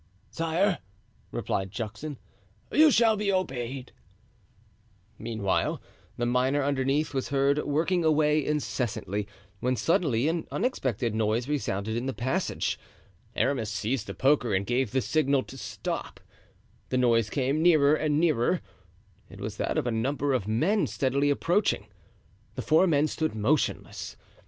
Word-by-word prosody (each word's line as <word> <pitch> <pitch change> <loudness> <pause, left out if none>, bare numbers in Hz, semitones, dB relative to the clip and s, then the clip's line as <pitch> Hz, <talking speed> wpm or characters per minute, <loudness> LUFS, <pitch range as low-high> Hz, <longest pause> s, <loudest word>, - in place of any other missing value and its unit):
"Sire," 170 +4 +1 0.5
replied 95 0 -2
Juxon, 115 +7 -5 0.5
"you 310 +1 +6
shall 230 -5 +4
be 205 -1 0
obeyed." 130 -8 -3 1.3
Meanwhile, 110 -4 -1 0.4
the 120 - 0
miner 130 +4 +2
underneath 140 +2 0
was 135 -1 -2
heard 140 +1 +2
working 165 +5 +1
away 155 -1 +3
incessantly, 120 -8 -2 0.3
when 125 +4 0
suddenly 140 -3 +1
an 165 0 -1
unexpected 130 - -1
noise 110 +3 0
resounded 110 -7 -2
in 120 +3 -2
the 135 - -3
passage. 150 +10 -1 0.6
Aramis 125 -6 0
seized 110 +2 -2
the - - -6
poker 130 -6 +2
and 95 +1 0
gave 125 +1 0
the 130 +3 0
signal 140 -3 +1
to - - -12
stop; - - -5 0.7
the 130 - 0
noise 115 -3 +3
came 140 +4 0
nearer 155 -4 +5
and 155 -1 +1
nearer. 165 0 +2 0.7
It 100 - -12
was 105 +1 -5
that - - -1
of - - 0
a 120 - 0
number 135 +5 0
of 115 -6 -1
men 160 - +2
steadily 140 +2 +1
approaching. 175 +8 +1 0.7
The - - -4
four 160 +4 +4
men 150 -3 +3
stood 155 -3 -2
motionless. 125 +8 -1
135 Hz, 135 wpm, -27 LUFS, 120-155 Hz, 1.3 s, you